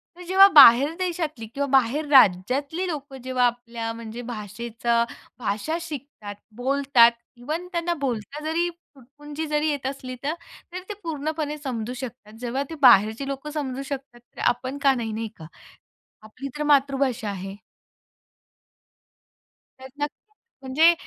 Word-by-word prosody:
तर 360 - -11
जेव्हा 380 +2 +7
बाहेर 275 +2 +9
देशातली 330 -10 -3
किंवा 275 +6 -3
बाहेर 270 +4 +2
राज्यातली 270 - +3
लोकं 285 -4 -6
जेव्हा 255 -1 +1
आपल्या 235 -1 -3
म्हणजे 230 +1 -8
भाषेचा 235 +2 -2 0.4
भाषा 215 +9 -2
शिकतात, 280 -10 -8 0.2
बोलतात, 260 -2 +4 0.3
इव्हन 310 +8 -4
त्यांना 345 0 -1
बोलता 270 +2 -4
जरी, 335 +2 0
तुटपुंजी 295 -2 -10
जरी 300 +1 0
येत 285 -3 -3
असली 265 -2 -6
तर, 295 +3 -1 0.4
तर 365 - -5
ते - - -3
पूर्णपणे 310 -1 -3
समजू 250 -5 -4
शकतात. 245 -4 -9
जेव्हा 250 +3 -2
ते 325 - -6
बाहेरची 225 +1 +5
लोकं 275 +2 -5
समजू 275 -3 -4
शकतात 270 -3 -6
तर 240 - -19
आपण 255 +3 0
का 275 -1 +5
नाही, 235 -3 -3
नाही 225 +1 -3
का? 160 - -10 0.8
आपली 255 +6 -8
तर - - -1
मातृभाषा 275 -5 +2
आहे. 195 0 -6 2.2
प्रयत्न 265 +3 -5 0.6
म्हणजे 300 +6 +4
270 Hz, 135 wpm, -24 LUFS, 235-300 Hz, 2.2 s, बाहेर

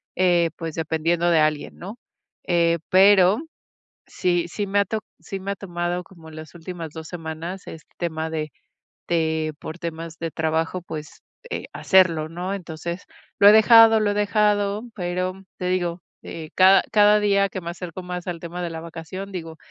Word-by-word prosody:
eh, 175 -2 +3
pues, 165 -2 -5
dependiendo 165 +2 0
de 165 - +4
alguien, 155 -1 0
¿no? 200 +6 -8 0.5
Eh, 170 -1 +2
pero 190 +1 +6 0.7
sí, 175 -1 0
sí 205 +4 -3
me 200 +1 +2
ha - - +3
to 220 +1 -3 0.2
sí 195 - -6
me 200 +1 -3
ha - - -6
tomado 175 -1 -3
como 165 -4 -15
las 155 0 -10
últimas 165 -1 -7
2 160 0 -8
semanas 170 +2 -6
este 160 - -12
tema 160 -2 -2
de 155 -1 -3 0.6
de 160 -2 0
por 160 - -7
temas 165 -1 -6
de 165 -1 -4
trabajo, 160 +2 -1
pues, 155 -3 -8 0.3
eh, - - -3
hacerlo, 170 -5 +3
¿no? 180 +4 -4
Entonces, 170 -1 -6 0.3
lo 200 - +7
he - - +11
dejado, 225 0 +7
lo 210 -1 +1
he - - -1
dejado, 210 0 +1
pero, 185 +1 -3
te 180 - -3
digo, 175 -1 -1 0.2
eh, 160 -2 -8
cada 190 +1 +7
cada 210 -1 +5
día 200 -1 +2
que 190 - -6
me 170 - -6
acerco 175 0 -7
más 180 -1 -6
al 175 -2 -4
tema 175 +1 -6
de 170 - -3
la 160 - -5
vacación, 170 +4 -8
digo: 165 -3 -7
175 Hz, 175 wpm, -23 LUFS, 165-195 Hz, 0.7 s, he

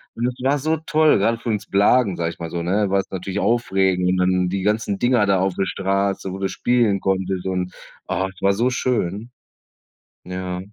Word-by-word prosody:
Und 120 +1 -1
es 125 - -3
war 140 +2 +2
so 155 +3 0
toll, 155 -2 +3
gerade 115 +3 +1
für 120 - -5
uns 105 -2 -1
Blagen, 100 0 +3
sage 85 -1 -1
ich - - -14
mal 85 -1 -6
so, 85 - -3
ne? 100 +3 +1
War 100 - +3
es 95 - -4
natürlich 95 +1 -4
aufregend 95 -6 +1
und 95 - +1
dann 90 0 +2
die 95 +1 -2
ganzen 105 -1 0
Dinger 120 -3 +3
da 100 -2 +2
auf 95 -1 0
der 95 - 0
Straße, 100 0 -1
wo 95 - -5
du 95 - 0
spielen 105 +1 +1
konntest 95 -1 -1
und, 90 -1 -2 0.3
ah, 95 - -1
es 95 - -19
war 100 0 +3
so 120 +5 +1
schön. 120 -3 -2 0.9
Ja. 90 0 -4
95 Hz, 215 wpm, -21 LUFS, 95-115 Hz, 0.9 s, toll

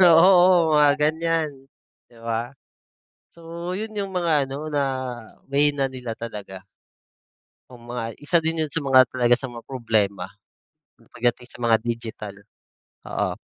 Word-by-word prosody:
oo, 175 -1 +6
mga 150 -1 +6
gan'yan 160 0 +1 0.6
di 120 - -21
ba? 115 +2 -2 0.8
So, 170 +1 -7
yun 215 +3 -5
yung 200 -2 -3
mga 165 -5 +2
ano 145 +3 -6
na 145 - +1 0.7
mahina 145 -1 +2
din 125 -1 -9
talaga. 105 -5 -8 1.1
Oh, 125 - -12
mga 120 -1 -6
isa 160 +4 +2
din 160 0 -1
yun - - -15
sa 165 - -1
mga 130 -2 +6
talaga 120 0 +2
sa 135 - -5
mga 120 -2 -9
problema 110 -7 0 0.9
pagdating 120 +1 0
sa 120 - -15
mga 115 -1 +4
digital, 115 -3 -5 0.7
oo. - - -2
135 Hz, 135 wpm, -23 LUFS, 120-165 Hz, 1.1 s, oo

